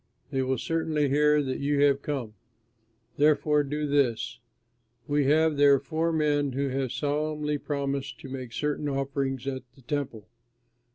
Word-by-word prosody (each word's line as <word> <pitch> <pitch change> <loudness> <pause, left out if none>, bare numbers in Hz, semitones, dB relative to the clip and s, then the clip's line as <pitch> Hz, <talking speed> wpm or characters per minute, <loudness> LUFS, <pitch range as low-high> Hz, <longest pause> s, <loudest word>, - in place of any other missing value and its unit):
They 135 -2 0
will 130 0 0
certainly 155 -1 0
hear 150 +1 +4
that 130 -1 -3
you 140 0 +1
have 140 -1 +4
come; 130 -8 -4 0.8
therefore 150 0 +4
do 150 +2 -2
this: 120 -5 0 0.7
we 145 -1 +2
have 155 +1 +3
here 140 -1 +7
four 160 +4 -1
men 145 -3 +1
who 140 +1 -1
have 130 -1 -2
solemnly 150 +1 -1
promised 140 -2 -3
to - - -8
make 130 -2 -6
certain 150 +3 -2
offerings 135 -1 -2
at 130 -1 -3
the 135 - -18
Temple. 130 -6 -4
140 Hz, 150 wpm, -27 LUFS, 135-150 Hz, 0.8 s, here